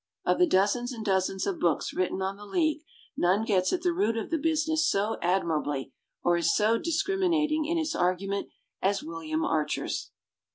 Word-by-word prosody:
Of - - +2
the 360 - +5
dozens 225 - +2
and 225 -3 -6
dozens 190 -1 0
of 195 - -2
books 170 -4 0
written 185 +1 -1
on 190 +1 -2
the 205 +1 -12
League 315 - +1 0.3
none 190 +5 +2
gets 185 -4 +2
at 355 -2 -1
the 355 -1 +2
root 335 - +1
of 225 - -4
the 325 - +1
business 315 0 +1
so 205 +3 0
admirably 155 -7 -1 0.3
or 175 0 +3
is 170 -1 +2
so 225 +2 +3
discriminating 325 -3 +1
in 335 +2 0
its 320 -1 -1
argu 185 -1 0
ment 200 0 -2 0.3
as 195 +1 +1
William 160 -1 -3
Archer's. 150 -1 -1
205 Hz, 180 wpm, -28 LUFS, -, 0.3 s, the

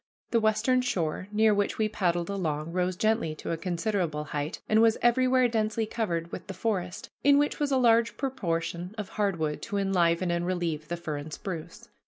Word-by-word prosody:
The 230 - +4
western 220 +4 +2
shore, 185 -7 -2
near 215 0 +4
which 205 0 0
we 220 - +2
paddled 175 -5 0
along, 160 -5 -2
rose 180 +1 0
gently 215 -6 +1
to - - -5
a - - +1
considerable 170 -2 -1
height 145 0 -4
and 215 +1 +4
was 225 0 +4
everywhere 255 +1 +4
densely 220 -1 0
covered 175 -7 -2
with - - -7
the 195 - -6
forest, 180 -5 -3
in 280 0 +6
which 290 +1 +1
was 290 -1 0
a 265 - +3
large 235 -2 +3
proportion 175 -7 -2
of 210 -3 -4
hard 200 -4 0
wood 155 -2 -2
to 205 - -3
enliven 180 -3 +2
and 170 0 -1
relieve 170 -4 -2
the 175 - -3
fir 160 -3 -4
and 145 +2 -7
spruce. 165 -1 -7
190 Hz, 195 wpm, -28 LUFS, 170-220 Hz, -, in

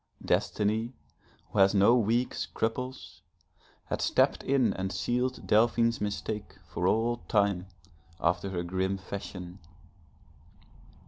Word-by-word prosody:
Destiny 110 +3 0 0.6
who 105 - -1
has 95 +1 +5
no 100 +5 +6
weak 120 +2 +1
scruples, 125 +4 -4 0.6
had - - -3
stepped - - +2
in 130 -6 +2
and 95 0 -3
sealed 125 +4 -1
Delphine's 115 +1 +3
mistake 105 +1 -4
for 90 - -1
all 115 +4 +2
time, 100 -3 +1 0.5
after 90 +3 0
her 90 -2 -2
grim 95 +2 -1
fashion. 95 -1 -7
105 Hz, 110 wpm, -29 LUFS, 95-115 Hz, 0.6 s, no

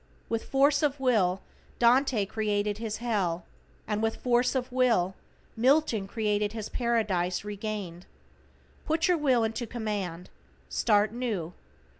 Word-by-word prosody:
With 230 -1 -2
force 285 +2 +3
of 290 -2 0
Will 200 -8 +2 0.4
Dante 240 -2 +3
created 210 0 -1
his 220 -2 -3
Hell, 195 -8 -1 0.4
and 210 0 -1
with 225 0 0
force 250 +1 +1
of 255 -1 -2
Will 235 -8 +2 0.4
Milton 245 -4 +2
created 210 -1 -1
his 220 -2 -5
Paradise 210 -7 0
Regained. 205 -4 -5 0.8
Put 320 +1 +2
your 360 -1 +3
Will 260 -6 +3
into 225 +2 -2
command. 205 -7 -4 0.4
Start 210 -1 +2
new. 215 -9 -3
220 Hz, 125 wpm, -28 LUFS, 205-250 Hz, 0.8 s, force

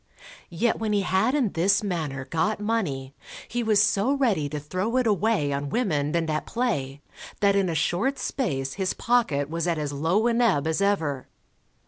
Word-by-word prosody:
Yet 220 +7 0
when 220 -2 -1
he 205 - +2
had 190 +8 +1
in 250 -9 +1
this 195 +5 +2
manner 155 -9 -3
got 165 +10 -1
money, 175 -12 -2 0.3
he 240 - -2
was 215 -3 +4
so 210 +5 +2
ready 215 - +1
to 150 - -4
throw 185 - -2
it 255 - +2
away 205 -8 +1
on 140 +1 -3
women 150 - 0
and 165 -1 0
at 155 -1 -2
play, 145 - -2 0.4
that 200 -1 +3
in 195 -2 +2
a 165 - -2
short 185 - 0
space 135 - -2
his 190 -2 -2
pocket 225 - +1
was 165 +3 -3
at 170 -2 0
as 145 -2 -3
low 165 +10 +1
an 240 0 +2
ebb 185 -12 +2
as 160 +4 0
ever. 160 -10 0
185 Hz, 185 wpm, -25 LUFS, 150-220 Hz, 0.4 s, was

